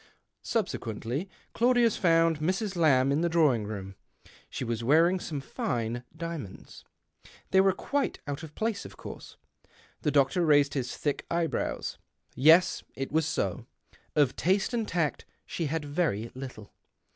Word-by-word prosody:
Subsequently 140 - -2 0.2
Claudius 240 -1 +3
found 165 -2 +3
Mrs. 190 +5 -1
Lamb 140 -6 +4
in 145 +3 +1
the 170 - +1
drawing 150 -10 +3
room. 100 -2 -6 0.6
She - - -4
was 115 -1 -2
wearing 165 +8 +4
some 150 -5 -4
tine 120 -2 -3
diamonds. 165 - -7 0.7
They 190 - +6
were 195 0 +4
quite 280 +8 -2
out 145 +1 -4
of 155 -2 -10
place, 220 -2 -1
of - - -11
course. - - -10 0.6
The 150 - +1
doctor 145 +5 +3
raised 145 -3 +4
his 130 -4 -3
thick 145 -2 -2
eye 170 0 +1
brows. - - -3 0.3
Yes, 160 +7 +5
it 135 0 -4
was 160 0 +2
so 130 -6 -2 0.2
— - - -30
of 145 -5 +3
taste 190 +6 +1
and 230 -3 -1
tact 165 -4 -1 0.2
she 165 - -3
had 155 +1 -2
very 145 - -1
little. 130 -5 -9
155 Hz, 150 wpm, -28 LUFS, 130-175 Hz, 0.7 s, They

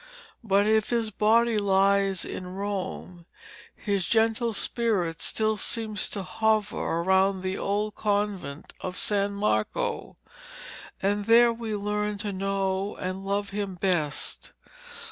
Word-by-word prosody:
But 200 -1 +3
if 220 0 +2
his 230 -2 0
body 220 +2 +3
lies 195 -1 +2
in 185 - -6
Rome, 190 -3 -5 0.5
his 200 -3 0
gentle 225 +1 +2
spirit 200 -7 -1
still 220 0 0
seems 215 0 -2
to 200 - -4
hover 215 +1 +1
around 190 +3 +2
the 185 +1 -2
old 205 +1 -1
convent 200 -8 -2
of 180 -1 -5
San 200 -1 0
Marco, 155 - -1 0.9
and 205 +1 +1
there 235 +1 +6
we 225 -2 -4
learn 210 0 -2
to 205 -1 -4
know 195 +1 -1
and 185 +1 -4
love 200 +1 -2
him 200 -2 -3
best. 170 -5 -1
200 Hz, 125 wpm, -27 LUFS, 190-215 Hz, 0.9 s, there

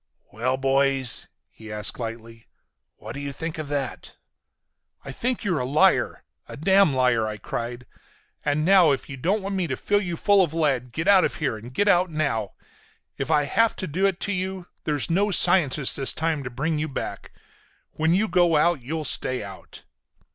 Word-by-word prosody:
"Well, 125 +5 -1
boys," 135 -1 0 0.2
he 110 -1 -12
asked 105 +2 0
lightly, 115 -1 -7 0.5
"what 110 +2 -9
do 140 - -7
you 140 0 -5
think 160 +3 -6
of 155 - -5
that?" 140 -3 -4 0.9
"I 135 - -6
think 240 - -2
you're 180 -7 0
a - - -1
liar! 140 +5 +2 0.3
A - - -8
damn 190 +1 +4
liar!" 125 -4 +2
I 110 -1 -5
cried. 120 +4 -5 0.6
"And 150 +1 0
now, 185 -3 +6
if 135 - -5
you 135 - -6
don't 190 +10 -1
want 195 +1 -4
me 185 -3 -1
to 130 - -3
fill 205 0 +1
you 175 -4 -4
full 200 +1 +4
of 165 -2 -3
lead, 135 -6 0
get 160 +9 -3
out 195 -2 +6
of - - -1
here 140 -7 -2
and 115 +3 -10
get 205 +10 0
out 180 -2 +4
now! 140 -10 -2 0.7
If 135 - -3
I 150 -2 +3
have 225 +10 +1
to 190 - -4
do 185 +5 0
it 190 -2 -2
to 205 - -1
you, 185 -1 -3 0.2
there's 150 +1 0
no 200 +5 +2
scientist 150 -8 +4
this 135 -2 +4
time 160 -3 -1
to - - -3
bring 150 +5 -2
you 155 - -2
back. 140 - -6 0.6
When 160 +2 +1
you 215 +3 +1
go 175 -4 +3
out 170 -2 +2
you'll 155 +5 -4
stay 130 -4 0
out!" 100 -2 -12
150 Hz, 195 wpm, -24 LUFS, 130-180 Hz, 0.9 s, now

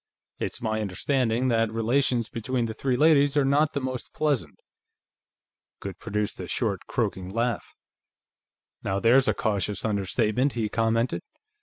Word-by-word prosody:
It's - - -4
my 110 -1 0
understanding 120 +5 0
that 115 -2 +2
relations 120 +1 +1
between 120 +2 -2
the 110 - -4
three 125 +2 -1
ladies 145 -1 +4
are 140 - +4
not 145 +3 +3
the 140 - 0
most 130 -2 -5
pleasant." 140 - 0 1.2
Goode 95 -2 -7
produced 105 -1 -2
a - - -5
short, - - -2
croaking 95 -1 -2
laugh. 115 +4 -2 1.1
"Now 95 0 -1
there's 125 +5 +5
a - - +2
cautious 105 -2 -1
understatement," 110 +5 +1
he 110 -3 -1
commented. 115 +2 0
115 Hz, 140 wpm, -26 LUFS, 105-130 Hz, 1.2 s, there's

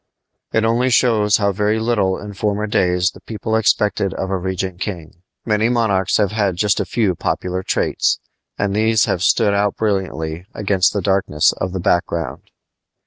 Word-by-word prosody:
It 110 0 +1
only 120 +3 +2
shows 110 -4 +3
how 100 -2 +1
very 105 +3 0
little 110 -5 +1
in 105 0 -8
former 105 +1 -1
days 90 -2 +1
the - - -16
people 110 0 -3
expected 105 -3 +1
of 95 - -3
a 95 - 0
regnant 95 0 -4
king. 85 -4 -6 0.2
Many 110 +1 +1
monarchs 100 -6 +1
have 105 -3 +1
had 100 -4 0
just 105 +3 +1
a - - -1
few 110 -6 +1
popular 90 +2 -2
traits, - - 0 0.4
and 100 0 -1
these 110 +1 +3
have 90 - -1
stood 100 +2 +3
out 100 0 0
brilliantly 90 -5 -2
against 95 -3 +1
the 100 - -2
darkness 95 -6 +2
of 95 - -4
the 95 - -4
background. 85 -2 -1
100 Hz, 170 wpm, -19 LUFS, 95-110 Hz, 0.4 s, shows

